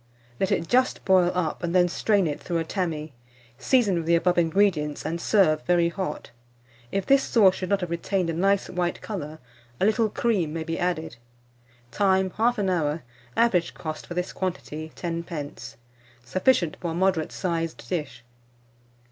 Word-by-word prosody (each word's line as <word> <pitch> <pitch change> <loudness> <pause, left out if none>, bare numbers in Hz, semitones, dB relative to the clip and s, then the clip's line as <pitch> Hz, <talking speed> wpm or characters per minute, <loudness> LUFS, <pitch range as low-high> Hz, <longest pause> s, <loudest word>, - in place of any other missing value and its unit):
Let 190 - 0
it 165 - 0
just 255 +1 +1
boil 185 -2 +4
up, 165 -4 -1
and 175 0 -2
then 180 -1 +5
strain 200 +2 +1
it 150 -3 -3
through 170 - -2
a 165 - 0
tammy; 160 -4 -3 0.5
season 240 -7 +3
with 165 -1 -3
the 170 - +5
above 175 +1 +2
ingredients, 165 -4 +1
and 165 +2 -3
serve 165 -8 +3
very 175 -1 +3
hot. 185 +2 -5 0.6
If 195 -1 -1
this 275 0 +5
sauce 200 -8 +4
should 185 -1 -5
not 200 -1 +1
have 175 -2 -4
retained 180 +2 -1
a 165 - -1
nice 195 +4 +2
white 175 -1 -2
colour, 155 -7 -6 0.4
a - - +2
little 220 +1 +2
cream 205 -8 0
may 165 -1 -3
be 165 0 -4
added. 160 -8 -2 0.7
Time. 190 +2 +2
1/2 220 -2 +1
hour. 160 -4 0 0.3
Average 185 -8 +2
cost, 155 -1 -6
for 175 - -6
this 180 0 -2
quantity, 160 -4 -4
10d. 165 -7 -5 0.5
Sufficient 185 - +2
for 175 - -2
a - - -3
moderate 185 -3 +1
sized 165 -3 -3
dish. 150 -8 -4
175 Hz, 165 wpm, -25 LUFS, 165-195 Hz, 0.7 s, then